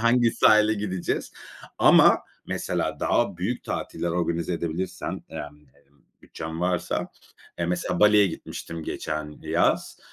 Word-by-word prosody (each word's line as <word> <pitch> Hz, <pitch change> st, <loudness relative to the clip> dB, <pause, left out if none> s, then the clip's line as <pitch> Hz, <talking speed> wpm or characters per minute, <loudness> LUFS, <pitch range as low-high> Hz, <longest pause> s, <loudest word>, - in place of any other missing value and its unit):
Hangi 115 Hz, 0 st, +4 dB
sahile 110 Hz, 0 st, +5 dB
gideceğiz?" 95 Hz, -4 st, -3 dB, 0.5 s
Ama -, -, +7 dB, 0.3 s
mesela -, -, -2 dB
daha -, -, +1 dB
büyük -, -, -3 dB
tatiller 85 Hz, -, -3 dB
organize 85 Hz, 0 st, -1 dB
edebilirsem, 85 Hz, +2 st, -4 dB
yani, 75 Hz, 0 st, -8 dB
emm, 70 Hz, 0 st, -29 dB, 0.2 s
bütçem 80 Hz, +1 st, -7 dB
varsa, 90 Hz, -1 st, -1 dB, 0.5 s
eee, 85 Hz, -, 0 dB
mesela 90 Hz, 0 st, -1 dB
Bali'ye 105 Hz, -1 st, +6 dB
gitmiştim 80 Hz, -1 st, -7 dB
geçen 75 Hz, -1 st, -4 dB
yaz. -, -, +1 dB
85 Hz, 120 wpm, -25 LUFS, 80-100 Hz, 0.5 s, Ama